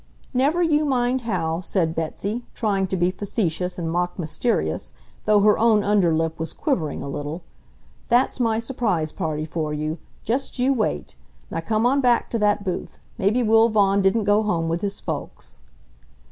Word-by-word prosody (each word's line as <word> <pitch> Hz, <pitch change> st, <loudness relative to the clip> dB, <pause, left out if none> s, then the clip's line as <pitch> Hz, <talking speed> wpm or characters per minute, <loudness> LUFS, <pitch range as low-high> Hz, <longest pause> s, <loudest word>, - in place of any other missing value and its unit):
"Never 290 Hz, +7 st, +2 dB
you 305 Hz, -2 st, +3 dB
mind 255 Hz, -2 st, +1 dB
how," 165 Hz, -4 st, -1 dB
said 170 Hz, -3 st, 0 dB
Betsy, 200 Hz, +8 st, -3 dB
trying 195 Hz, -4 st, 0 dB
to 190 Hz, -, -2 dB
be 175 Hz, +1 st, +2 dB
facetious 180 Hz, -3 st, -2 dB
and 165 Hz, -2 st, -2 dB
mock 175 Hz, +1 st, -1 dB
mysterious, 170 Hz, +7 st, -1 dB, 0.3 s
though 210 Hz, -1 st, +4 dB
her 210 Hz, +1 st, +4 dB
own 220 Hz, -2 st, +4 dB
under 200 Hz, -4 st, +3 dB
lip 160 Hz, 0 st, -1 dB
was 160 Hz, -, -4 dB
quivering 165 Hz, -, -1 dB
a -, -, -6 dB
little. 145 Hz, +4 st, -5 dB, 0.7 s
"That's 245 Hz, +2 st, +2 dB
my 225 Hz, -2 st, +2 dB
surprise 220 Hz, -, -1 dB
party 155 Hz, -4 st, -3 dB
for 155 Hz, -1 st, -3 dB
you. 155 Hz, +2 st, -3 dB, 0.2 s
Just 260 Hz, +6 st, -2 dB
you 255 Hz, +2 st, +3 dB
wait. 225 Hz, -5 st, -2 dB, 0.4 s
Now -, -, -2 dB
come 220 Hz, +1 st, 0 dB
on 275 Hz, +3 st, +3 dB
back 245 Hz, -2 st, +2 dB
to 230 Hz, -, 0 dB
that 205 Hz, -1 st, +2 dB
booth. 185 Hz, -3 st, -4 dB, 0.2 s
Maybe 215 Hz, +6 st, +2 dB
Will 225 Hz, +1 st, +5 dB
Vaughan 200 Hz, -2 st, +3 dB
didn't 195 Hz, +3 st, +2 dB
go 205 Hz, +1 st, +3 dB
home 175 Hz, -6 st, 0 dB
with 165 Hz, +1 st, -1 dB
his 200 Hz, -1 st, -3 dB
folks." -, -, -6 dB
200 Hz, 175 wpm, -23 LUFS, 165-230 Hz, 0.7 s, Will